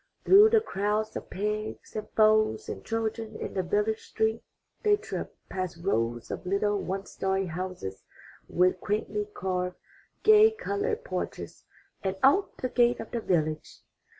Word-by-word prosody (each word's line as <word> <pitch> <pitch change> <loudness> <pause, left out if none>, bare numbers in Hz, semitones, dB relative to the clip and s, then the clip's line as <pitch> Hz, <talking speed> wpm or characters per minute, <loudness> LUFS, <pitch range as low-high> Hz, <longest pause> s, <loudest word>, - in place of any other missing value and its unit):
Through 410 +3 +8
the 445 -1 +4
crowds 210 - -1
of - - -6
pigs, 210 +2 -4
and 215 -1 -4
fowls, 215 0 +4
and - - -6
children 225 -1 -3
in - - -5
the 190 - 0
village 210 +4 0
street 220 +1 -1 0.4
they 420 -2 +4
tripped, 415 - -6
past 185 -3 -4
rows 120 - -1
of - - -5
little 200 +2 +1
one 190 +1 -3
story 190 0 -1
houses 175 - -5 0.5
with 180 +1 +2
quaintly 210 0 -2
carved, 180 -1 -2 0.5
gay 435 0 +8
colored 440 +2 -2
porches, - - -5 0.4
and 190 -1 -1
out 335 +10 +4
the 255 - -2
gate 240 -1 +3
of 225 - -7
the 235 - -2
village. 155 -5 -1
210 Hz, 150 wpm, -28 LUFS, 185-235 Hz, 0.5 s, Through